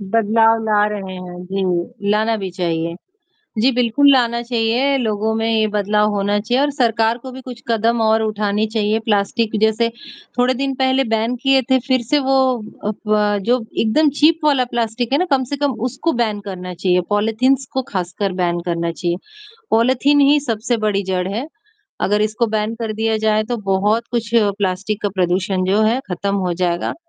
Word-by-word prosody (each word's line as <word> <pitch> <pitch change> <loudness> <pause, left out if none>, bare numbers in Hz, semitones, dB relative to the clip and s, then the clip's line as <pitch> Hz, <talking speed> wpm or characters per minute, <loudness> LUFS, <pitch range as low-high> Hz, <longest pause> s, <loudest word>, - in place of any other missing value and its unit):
बदलाव 225 +2 +2
ला 210 -1 +3
रहे 195 -3 -5
हैं, 180 -1 -8
जी, 190 +1 -2
लाना 220 +2 +1
भी 195 -3 -5
चाहिए। 170 -2 -2 0.7
जी, 260 +4 +4
बिल्कुल 250 +4 +3
लाना 235 -3 +2
चाहिए 240 +3 +1
लोगों 220 -3 -1
में 225 0 -1
ये 220 -1 +2
बदलाव 210 +1 +1
होना 205 0 0
चाहिए 245 +5 0
और 290 - +2
सरकार 230 -3 +1
को 260 +1 -10
भी 260 +1 -9
कुछ 245 -2 -10
कदम 230 +1 +1
और 220 0 +3
उठाने 210 0 0
चाहिए, 215 0 0
प्लास्टिक 215 +1 0
जैसे 220 +1 +2 0.5
थोड़े 250 +1 +3
दिन 270 +1 -2
पहले 265 +1 +2
बैन 225 +2 0
किए 270 -1 +4
थे, 260 - +5
फिर 260 -2 +2
से 290 +6 +1
वो 270 -1 +1 0.5
अ, 210 - 0
फ़व 210 -1 0
जो 250 +2 +2 0.2
एकदम 295 +8 +3
चीप 315 +2 +4
वाला 275 -4 +3
प्लास्टिक 235 +1 -2
है - - +4
ना 365 - +1
कम 265 -1 +3
से 285 - -1
कम 285 -2 0 0.2
उसको 270 +7 -2
बैन 215 -3 -1
करना 180 -1 -6
चाहिए, 180 +1 +1
पॉलीथींस 225 +6 +1
को 265 - 0
खासकर 185 +1 -2
बैन 175 0 0
करना 170 -1 -1
चाहिए। 175 +1 -2 0.5
पॉलीथीन 260 +5 +3
ही 285 +1 +5
सबसे 235 -2 -1
बड़ी 200 -1 +1
जड़ 185 -1 -2
है, 225 +8 -3 0.5
अगर 210 +1 +1
इसको 215 +3 0
बैन 215 0 -1
कर 225 -2 -3
दिया 220 +1 0
जाए 215 0 +2
तो 240 +2 -3 0.2
बहुत 210 +4 +1
कुछ 235 -2 -2 0.3
प्लास्टिक 200 +2 -2
का 205 - +1
प्रदूषण 185 0 0
जो 200 +3 +2
है 225 +4 +2
खत्म 200 +3 -2
हो 185 -3 -1
जाएगा। 175 -1 -1
220 Hz, 185 wpm, -19 LUFS, 200-245 Hz, 0.7 s, थे